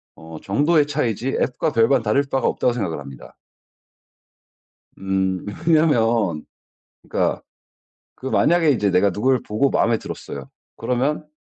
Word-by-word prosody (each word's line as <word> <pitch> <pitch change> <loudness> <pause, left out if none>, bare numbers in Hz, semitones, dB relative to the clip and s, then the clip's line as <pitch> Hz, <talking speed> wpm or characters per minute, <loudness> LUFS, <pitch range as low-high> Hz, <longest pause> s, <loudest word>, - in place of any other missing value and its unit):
어 80 -1 -11
정도의 145 - +2
차이지 130 -4 -2
앱과 125 - -1
별반 115 +3 +3
다를 125 +7 +2
바가 135 -3 0
없다고 125 - +1
생각을 100 -9 -3
합니다. 65 -3 -12 1.6
음. 95 -1 -1 0.2
왜냐면 115 - +2 0.6
그러니까 - - -1 0.7
그 130 - -10
만약에 165 +3 +3
인제 105 -7 +1
내가 100 +2 +3
누굴 125 +6 +1
보고 110 +6 0
마음에 115 -1 +2
들었어요. - - -8 0.3
그러면 140 +5 -1
120 Hz, 285 characters per minute, -21 LUFS, 95-140 Hz, 1.6 s, 별반